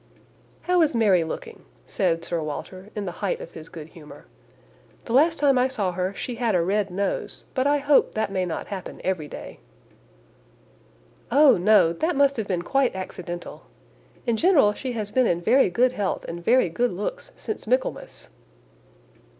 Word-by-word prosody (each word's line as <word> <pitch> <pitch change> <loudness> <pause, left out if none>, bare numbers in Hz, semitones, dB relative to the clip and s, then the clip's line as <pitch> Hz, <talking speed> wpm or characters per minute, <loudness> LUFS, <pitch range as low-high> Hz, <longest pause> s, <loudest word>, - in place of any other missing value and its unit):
"How 360 -1 +3
is 305 -5 +2
Mary 200 -7 +4
looking?" 460 - -7 0.2
said 170 -4 -1
Sir 170 -2 -2
Walter, 185 +6 -7
in 210 -2 -3
the 180 - -3
height - - -1
of - - -9
his 155 - -11
good 160 -3 -10
humour. 155 -2 -14 0.8
"The 230 - -4
last 320 +5 +4
time 275 -3 +3
I 250 - +3
saw 205 -8 -2
her 180 +1 -2
she 250 - -4
had 230 -4 +1
a 175 - +3
red 200 +2 0
nose, 195 +2 -3
but 260 +1 +1
I 290 0 +3
hope 285 0 +3
that 215 -2 -1
may 190 -1 0
not 170 -3 -4
happen 195 -3 -7
every 180 -5 -2
day." - - -10 1.7
"Oh! 285 +2 +6
no, 180 -3 +4
that 320 - -1
must 280 -1 +3
have 220 -3 -3
been 180 -3 -1
quite 270 +3 +1
accidental. 175 -2 -7 0.6
In 235 -2 +1
general 285 - +4
she 255 +3 -5
has 210 -3 -4
been 255 -2 +3
in 170 - +1
very 250 +7 +3
good 245 +8 +2
health 205 -6 -2
and 170 +1 -6
very 245 +2 +4
good 240 +9 0
looks 210 - -5
since 430 - -6
Michaelmas." 255 +3 -2
210 Hz, 175 wpm, -24 LUFS, 180-265 Hz, 1.7 s, Oh